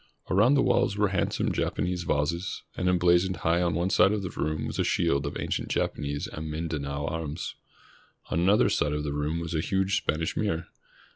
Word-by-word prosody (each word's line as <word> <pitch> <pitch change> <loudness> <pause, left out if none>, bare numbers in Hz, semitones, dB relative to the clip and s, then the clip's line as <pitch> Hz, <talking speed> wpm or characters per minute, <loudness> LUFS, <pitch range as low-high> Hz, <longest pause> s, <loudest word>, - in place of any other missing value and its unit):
Around 105 +9 +5
the 135 - +4
walls 120 -5 +2
were 105 -1 +3
handsome 95 -3 0
Japanese 90 0 -1
vases, 85 +5 -1
and 90 - 0
emblazoned 90 +1 +3
high 85 +2 +3
on 85 -2 +1
one 85 +3 0
side 100 - +5
of 105 -2 -1
the 90 - -4
room 75 0 -2
was - - -4
a - - +3
shield 70 -5 +1
of - - -4
ancient - - -2
Japanese 70 -1 -1
and 80 +1 -6
Mindanao 75 -3 -3
arms. 80 +1 -4 0.8
On - - +1
another 95 +5 +4
side 75 - +1
of 75 0 -2
the 75 -1 -2
room 75 +3 -1
was 85 0 -4
a 80 - +1
huge 95 +3 +1
Spanish 80 -2 -1
mirror. 85 -6 -1
85 Hz, 195 wpm, -27 LUFS, 75-95 Hz, 0.8 s, Around